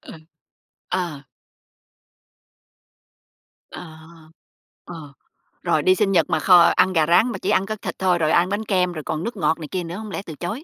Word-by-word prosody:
Ờ. -, -, -12 dB, 0.8 s
Ờ. 160 Hz, -6 st, -3 dB, 2.5 s
À. 160 Hz, -3 st, -10 dB, 0.9 s
Ờ, 160 Hz, -5 st, -10 dB, 0.5 s
rồi -, -, 0 dB
đi 185 Hz, 0 st, +4 dB
sinh 200 Hz, -1 st, 0 dB
nhật 170 Hz, -4 st, +3 dB
mà 160 Hz, -, 0 dB
kho 180 Hz, +1 st, +6 dB
ăn 185 Hz, -, +3 dB
gà 160 Hz, -2 st, +2 dB
rán, 220 Hz, +8 st, +3 dB
mà 195 Hz, -, -5 dB
chỉ -, -, -3 dB
ăn 195 Hz, -, +2 dB
có 215 Hz, -, -4 dB
thịt 210 Hz, -, -7 dB
thôi, 185 Hz, -2 st, +2 dB
rồi 155 Hz, -1 st, 0 dB
ăn 180 Hz, +2 st, +2 dB
bánh 210 Hz, +2 st, -3 dB
kem, 180 Hz, -3 st, 0 dB
rồi 155 Hz, -2 st, -7 dB
còn 160 Hz, +2 st, -4 dB
nước 230 Hz, -2 st, -5 dB
ngọt 165 Hz, -2 st, 0 dB
này 155 Hz, -, -7 dB
kia 185 Hz, -2 st, -3 dB
nữa 170 Hz, +2 st, -7 dB
hổng 215 Hz, -2 st, -8 dB
lẽ 195 Hz, -, -4 dB
từ 160 Hz, -, -9 dB
chối? 195 Hz, -, -6 dB
180 Hz, 190 wpm, -21 LUFS, 160-195 Hz, 2.5 s, kho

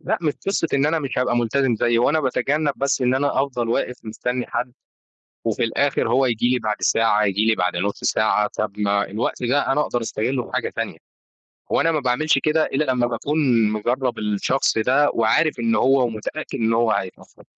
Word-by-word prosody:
لأ -, -, -1 dB
مش 155 Hz, -3 st, +1 dB
قصة 195 Hz, -4 st, 0 dB
إن 140 Hz, +1 st, +2 dB
أنا 160 Hz, +1 st, +1 dB
مش 135 Hz, -4 st, -4 dB
هابقى 125 Hz, -1 st, +1 dB
ملتزم 120 Hz, +1 st, +1 dB
زيه، 120 Hz, +1 st, +1 dB
هوأنا 150 Hz, +6 st, +2 dB
بتجنب 145 Hz, +3 st, 0 dB
بس 140 Hz, 0 st, 0 dB
إن 125 Hz, 0 st, +2 dB
أنا 135 Hz, 0 st, +1 dB
أفضل 125 Hz, -4 st, -3 dB
واقف 125 Hz, +1 st, -1 dB
مستني 125 Hz, +3 st, -3 dB
حد 120 Hz, +1 st, -3 dB, 0.7 s
وفي -, -, 0 dB
الآخر 125 Hz, +1 st, 0 dB
هو 130 Hz, +3 st, +3 dB
يجي 120 Hz, -1 st, +1 dB
لي 125 Hz, 0 st, +1 dB
بعد 110 Hz, -1 st, -2 dB
ساعة، 105 Hz, -2 st, +2 dB
يجي 100 Hz, +2 st, +1 dB
لي 110 Hz, -, +3 dB
بعد 90 Hz, -2 st, -1 dB
نص 100 Hz, +4 st, -2 dB
ساعة، 105 Hz, -1 st, +2 dB
طَب 105 Hz, -1 st, -3 dB
ما 100 Hz, 0 st, +1 dB
الوقت 110 Hz, +4 st, -3 dB
ده 130 Hz, +4 st, +1 dB
أنا 150 Hz, +2 st, +2 dB
أقدر 120 Hz, -4 st, -2 dB
أستغله 120 Hz, +3 st, -2 dB
في -, -, -13 dB
حاجة -, -, -1 dB
تانية، -, -, -4 dB, 0.7 s
وأنا 165 Hz, -, +2 dB
ما 155 Hz, -, 0 dB
باعملش 135 Hz, +3 st, +1 dB
كده 155 Hz, +2 st, +1 dB
إلا 150 Hz, +3 st, -1 dB
لما 120 Hz, -1 st, +1 dB
باكون 125 Hz, -2 st, +1 dB
مجرب 120 Hz, +3 st, -1 dB
الشخص 105 Hz, +5 st, 0 dB
ده 130 Hz, +6 st, +3 dB
وعارف 115 Hz, +8 st, +2 dB
إن 115 Hz, -1 st, +1 dB
هو 130 Hz, +3 st, +3 dB
ومتأكد 115 Hz, +7 st, -5 dB
إن 115 Hz, 0 st, +1 dB
هو 115 Hz, 0 st, +2 dB
هيتأخر. 95 Hz, -3 st, -5 dB
125 Hz, 195 wpm, -21 LUFS, 110-135 Hz, 0.7 s, هو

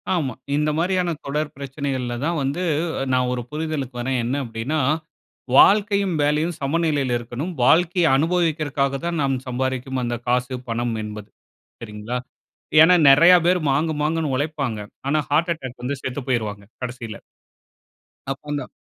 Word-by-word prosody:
ஆமா. 140 Hz, -8 st, -1 dB, 0.2 s
இந்தமாரியான 170 Hz, +4 st, +1 dB
தொடர் 150 Hz, +1 st, -2 dB
பிரச்சனைகள்ல 135 Hz, -3 st, -3 dB
தான் 170 Hz, +1 st, 0 dB
வந்து 140 Hz, +7 st, -2 dB, 0.4 s
அ -, -, 0 dB
நான் 125 Hz, 0 st, +2 dB
ஒரு 125 Hz, -, -2 dB
புரிதலுக்கு 150 Hz, -4 st, -3 dB
வரேன். 130 Hz, +1 st, -1 dB
என்ன 125 Hz, +4 st, -1 dB
அப்பிடின்னா, 120 Hz, +6 st, -3 dB, 0.8 s
"வாழ்க்கையும், 200 Hz, -2 st, +5 dB
வேலையும் 155 Hz, +4 st, +1 dB
சமநிலையில 145 Hz, -3 st, 0 dB
இருக்கணும். 125 Hz, +9 st, -5 dB
வாழ்க்கைய 175 Hz, +5 st, +4 dB
அனுபவிக்கிறதுக்காக 150 Hz, -4 st, 0 dB
தான் 170 Hz, -1 st, -1 dB
நாம் 135 Hz, -1 st, +1 dB
சம்பாரிக்கும் 130 Hz, +1 st, -2 dB
அந்த 120 Hz, 0 st, -2 dB
காசு, 125 Hz, +1 st, +1 dB, 0.2 s
பணம் 115 Hz, 0 st, -1 dB
என்பது." 105 Hz, -1 st, -8 dB, 0.5 s
சரிங்களா? 105 Hz, +2 st, -5 dB, 0.6 s
ஏன்னா, 170 Hz, +3 st, +7 dB
நெறையா 170 Hz, +6 st, +8 dB
பேரு 180 Hz, 0 st, +3 dB
மாங்கு, 155 Hz, +4 st, +1 dB
மாங்குன்னு 155 Hz, -2 st, 0 dB
ஒழைப்பாங்க. 140 Hz, -6 st, -2 dB, 0.3 s
ஆனா, 155 Hz, +2 st, +2 dB
ஹார்ட் 160 Hz, +4 st, +2 dB
அட்டாக் 130 Hz, -6 st, -9 dB
வந்து 130 Hz, +2 st, -3 dB
செத்து 130 Hz, +2 st, -3 dB
போயிருவாங்க, 105 Hz, -5 st, -2 dB, 0.2 s
கடைசில. 120 Hz, -4 st, -5 dB, 1.2 s
அப் 135 Hz, -, -5 dB
அந்த. 145 Hz, -1 st, -3 dB
140 Hz, 135 wpm, -22 LUFS, 125-160 Hz, 1.2 s, நெறையா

